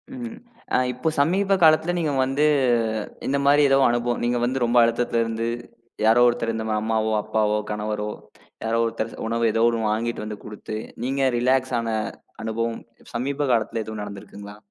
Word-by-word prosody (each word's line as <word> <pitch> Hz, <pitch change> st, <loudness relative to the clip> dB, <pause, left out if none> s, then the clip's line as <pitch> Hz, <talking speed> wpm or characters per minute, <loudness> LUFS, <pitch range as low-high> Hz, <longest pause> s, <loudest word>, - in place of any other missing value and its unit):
ம். 240 Hz, -2 st, -6 dB, 0.4 s
அ -, -, +5 dB, 0.2 s
இப்போ 125 Hz, +6 st, -1 dB
சமீப 195 Hz, +6 st, +3 dB
காலத்துல 160 Hz, +2 st, +5 dB
நீங்க 155 Hz, -4 st, 0 dB
வந்து 140 Hz, +3 st, +1 dB, 0.8 s
இந்த 140 Hz, -, +1 dB
மாரி 145 Hz, +1 st, +5 dB
எதோ 135 Hz, -, +5 dB
அனுபவம் 120 Hz, 0 st, 0 dB
நீங்க 120 Hz, 0 st, +1 dB
வந்து 130 Hz, 0 st, 0 dB
ரொம்ப 120 Hz, +1 st, +1 dB
அழுத்தத்துல 115 Hz, 0 st, +1 dB
இருந்து 115 Hz, 0 st, -2 dB, 0.6 s
யாரோ 115 Hz, +2 st, +5 dB
ஒருத்தர் 120 Hz, -1 st, 0 dB
இந்த 110 Hz, 0 st, -3 dB, 0.2 s
அம்மாவோ, 110 Hz, 0 st, 0 dB
அப்பாவோ, 105 Hz, -1 st, +1 dB
கணவரோ 105 Hz, 0 st, -3 dB, 0.5 s
யாரோ 115 Hz, +1 st, 0 dB
ஒருத்தர் 115 Hz, 0 st, -3 dB, 0.2 s
உணவு 115 Hz, +1 st, 0 dB
எதோ 115 Hz, +1 st, +1 dB
ஒண்ணு 115 Hz, -2 st, -1 dB
வாங்கிட்டு 115 Hz, 0 st, -2 dB
வந்து 105 Hz, -1 st, -6 dB
கொடுத்து 105 Hz, 0 st, -7 dB, 0.3 s
நீங்க 135 Hz, 0 st, +1 dB
ரிலாக்ஸ் 130 Hz, +1 st, +1 dB
ஆன 115 Hz, 0 st, -3 dB, 0.5 s
அனுபவம் 115 Hz, +1 st, -2 dB, 0.4 s
சமீப 140 Hz, +4 st, -1 dB
காலத்துல 115 Hz, -1 st, 0 dB
எதுவும் 110 Hz, 0 st, -6 dB
நடந்துருக்குங்களா? 100 Hz, 0 st, -9 dB
115 Hz, 155 wpm, -23 LUFS, 110-135 Hz, 0.8 s, அ